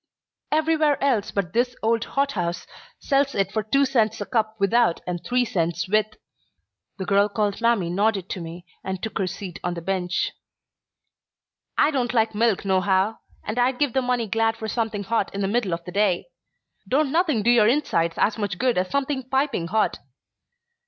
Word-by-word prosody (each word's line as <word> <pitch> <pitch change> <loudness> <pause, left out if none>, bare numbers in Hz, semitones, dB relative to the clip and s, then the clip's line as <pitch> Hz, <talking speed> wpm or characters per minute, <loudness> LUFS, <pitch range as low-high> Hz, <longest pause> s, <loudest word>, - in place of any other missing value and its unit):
"Everywhere 310 -1 +2
else 245 -8 +1
but 190 -3 -2
this 245 +1 +1
old 230 0 +2
hothouse 180 -12 -1 0.3
sells 275 0 +1
it 195 -1 0
for 220 - 0
two 275 +7 +2
cents 225 -4 +1
a - - -3
cup 220 -3 0
without, 200 -1 +3
and 175 -1 -4
three 250 0 +1
cents 170 -6 -1
with." 215 +2 +2 0.9
The 190 - -4
girl 200 +2 +3
called 210 0 -1
Mamie 230 -7 +2
nodded 200 0 +1
to 185 - -4
me 170 +2 -8 0.2
and 190 -1 -3
took 220 - -3
her 190 - 0
seat 185 -1 -6
on 175 0 -2
the 170 - -5
bench. 180 -1 -1 1.5
"I - - +4
don't 250 -4 -1
like 220 -1 +2
milk 215 -2 +1
nohow, 190 +2 +1 0.2
and 215 +4 -3
I'd 250 +1 +2
give 285 -4 +1
the 265 - +2
money 250 -2 0
glad 225 +2 0
for 220 - -5
something 220 -2 -2
hot 225 -1 0
in 200 - -2
the 195 - +1
middle 215 -2 0
of 170 0 -3
the 180 - -7
day. 200 - +1 0.6
Don't 280 +1 +2
nothing 315 - +2
do 240 - +4
your 225 -3 +5
insides 195 - +1
as 220 +2 +1
much 200 -4 -2
good 250 -4 +2
as 185 0 -1
something 270 -2 -2
piping 265 - 0
hot. 215 +5 0
220 Hz, 185 wpm, -24 LUFS, 190-250 Hz, 1.5 s, your